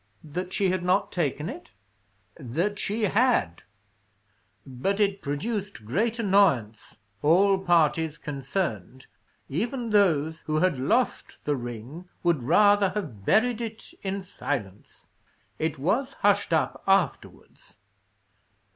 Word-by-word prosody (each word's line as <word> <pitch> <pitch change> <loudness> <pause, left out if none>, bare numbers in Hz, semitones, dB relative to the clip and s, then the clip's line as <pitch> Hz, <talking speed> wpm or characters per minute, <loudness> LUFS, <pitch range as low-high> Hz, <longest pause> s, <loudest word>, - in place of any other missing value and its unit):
"That 180 +4 -5
she 190 -1 +1
had 185 -1 -1
not 180 +3 +1
taken 150 -3 -1
it?" 310 - -9 0.7
"That 170 - -2
she 215 +2 -2
had. 210 - +2 1.0
But 140 +10 -2
it 200 -1 +1
produced 195 - -4
great 215 - 0
annoyance; 185 - +1 0.2
all 190 +6 +4
parties 165 -3 +2
concerned, 135 - -4 0.4
even 230 - -3
those 160 -6 +2
who 155 - 0
had 155 -4 +2
lost 220 - -1
the 145 - +1
ring, 120 +8 -8
would 170 -6 +2
rather 205 - +4
have 115 - -5
buried 240 +2 +3
it 225 -1 -7
in 195 0 -3
silence. 115 - -6 0.5
It 160 -1 -1
was 235 - 0
hushed 205 -3 +1
up 160 - 0
afterwards. 195 - -1
180 Hz, 115 wpm, -26 LUFS, 145-205 Hz, 1.0 s, all